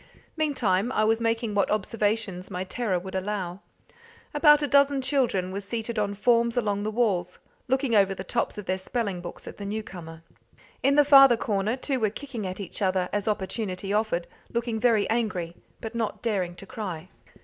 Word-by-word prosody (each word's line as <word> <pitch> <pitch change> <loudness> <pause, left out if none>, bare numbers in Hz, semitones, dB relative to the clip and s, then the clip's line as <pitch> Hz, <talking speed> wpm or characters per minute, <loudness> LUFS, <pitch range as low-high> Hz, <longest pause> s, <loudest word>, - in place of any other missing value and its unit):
Meantime 245 - +1
I 215 - +2
was 225 +1 +2
making 230 -1 0
what 200 -1 +2
observations 210 -2 -1
my 185 -2 -3
terror 190 0 -1
would 190 +2 -7
allow. 190 -2 -3 0.7
About 295 0 +6
a - - +1
dozen 280 0 +4
children 245 -9 +1
were 195 - -3
seated 225 +2 -4
on 205 -1 -1
forms 235 +2 +2
along 205 -4 0
the 210 - -1
walls, 200 -6 0 0.3
looking 265 -1 +1
over 195 -2 +4
the 185 - -6
tops 235 +4 -2
of 210 - -6
their 185 +1 -1
spelling 200 -2 -3
books 175 - -9
at - - -8
the 205 - -7
newcomer. 175 -6 -6 0.6
In 275 +2 +3
the 295 0 +6
farther 275 -4 +8
corner 210 +1 0
two 265 0 -2
were 215 -2 +2
kicking 235 -3 -6
at 185 +1 -6
each 200 +1 -6
other 185 -2 +1
as 205 +1 -1
opportunity 200 -1 -2
offered, 210 -5 0 0.3
looking 235 -1 -1
very 225 -4 +3
angry, 200 -7 -1 0.3
but 225 +1 -6
not 225 -1 -3
daring 190 -6 -1
to 195 - -10
cry. 185 -5 -6
210 Hz, 180 wpm, -26 LUFS, 190-235 Hz, 0.7 s, farther